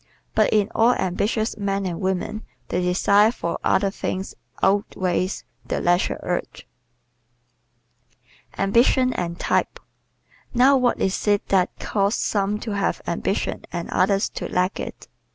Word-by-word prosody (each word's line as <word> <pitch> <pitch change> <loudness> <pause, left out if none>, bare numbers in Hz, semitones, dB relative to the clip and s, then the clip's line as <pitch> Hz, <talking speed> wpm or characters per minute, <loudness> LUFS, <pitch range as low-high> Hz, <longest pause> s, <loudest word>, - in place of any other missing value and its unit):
But - - +3
in 210 -1 +2
all 235 +2 +4
ambitious 205 +4 -1
men 200 -1 -1
and 175 -1 -3
women 190 +3 -2 0.3
the 180 - 0
desire 200 +4 +4
for 170 -8 -4
other 195 0 +2
things 190 -1 -4 0.3
outweighs 190 -1 0 0.2
the - - -2
leisure 175 +1 +1
urge. 175 0 -4 1.9
Ambition 240 +5 +3
and 170 -1 -4
Type - - 0
¶ - - -31 0.7
Now 260 +3 +6
what 250 -2 +2
is 190 +2 -1
it 205 -1 +2
that 185 -2 +2
causes 200 +1 0
some 205 0 0
to 225 - -4
have 200 -1 -1
ambition - - -2
and 170 - -5
others 195 +2 +2
to - - -6
lack 180 +2 0
it? - - -7
195 Hz, 135 wpm, -23 LUFS, 185-215 Hz, 1.9 s, Now